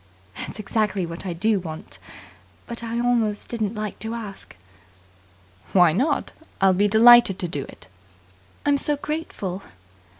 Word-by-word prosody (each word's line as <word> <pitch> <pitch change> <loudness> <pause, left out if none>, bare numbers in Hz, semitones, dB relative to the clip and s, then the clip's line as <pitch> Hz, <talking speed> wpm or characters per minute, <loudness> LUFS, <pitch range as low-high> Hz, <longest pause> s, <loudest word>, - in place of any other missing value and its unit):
"That's - - -7
exactly 210 -3 -1
what 170 +3 -7
I 175 - -2
do 205 +4 +1
want. 160 -3 -9 0.7
But 235 0 -7
I 230 0 -3
almost 235 -4 0
didn't 220 -2 -2
like 210 -1 -5
to 225 +1 -4
ask." 210 - -8 1.2
"Why 175 -4 +6
not? 275 - 0 0.3
I'll 190 -1 +5
be 200 +3 +3
delighted 225 -1 +7
to 180 - -2
do 145 -5 -3
it." - - -13 0.8
"I'm 285 -1 +3
so 295 +1 -1
grateful." 280 - -4
210 Hz, 140 wpm, -23 LUFS, 185-235 Hz, 1.2 s, delighted